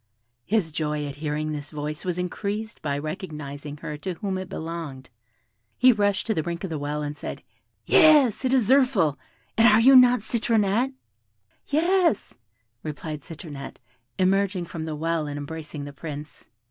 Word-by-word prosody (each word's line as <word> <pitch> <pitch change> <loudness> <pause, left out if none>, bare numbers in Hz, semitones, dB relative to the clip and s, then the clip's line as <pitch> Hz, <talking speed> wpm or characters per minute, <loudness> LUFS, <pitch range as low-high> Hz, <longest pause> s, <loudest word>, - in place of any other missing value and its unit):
His 200 -6 +1
joy 150 -1 -2
at 140 -1 -6
hearing 155 0 -2
this 145 -1 -5
voice 150 0 -5
was 180 -1 -2
increased 205 +5 -3
by 145 -2 -1
recognising 150 -3 -6
her 150 0 -6
to 185 +2 -4
whom 190 +1 -3
it 185 -1 -7
belonged. 160 -8 -6 0.7
He 255 +1 +7
rushed 205 -3 +1
to 225 - +1
the 160 - 0
brink 170 +2 -4
of 190 - -4
the 155 - -2
well, 150 +1 -3
and 145 0 -4
said, - - -7 0.4
"Yes, 295 - +6
it 255 - +1
is 255 -6 +3
Zirphil. 230 - +3 0.4
And 225 - +7
are 215 0 +6
you 265 +4 +7
not 250 -2 +7
Citronette?" 230 +2 +1 0.7
"Yes," 335 - +2 0.5
replied 155 0 -5
Citronette, 145 -3 -9 0.4
emerging 190 -1 +2
from 165 -1 -6
the 155 -1 -4
well, 160 0 -1
and 145 0 -4
embracing 150 0 -6
the 145 - -8
Prince. 150 0 -8
165 Hz, 160 wpm, -25 LUFS, 150-215 Hz, 0.7 s, He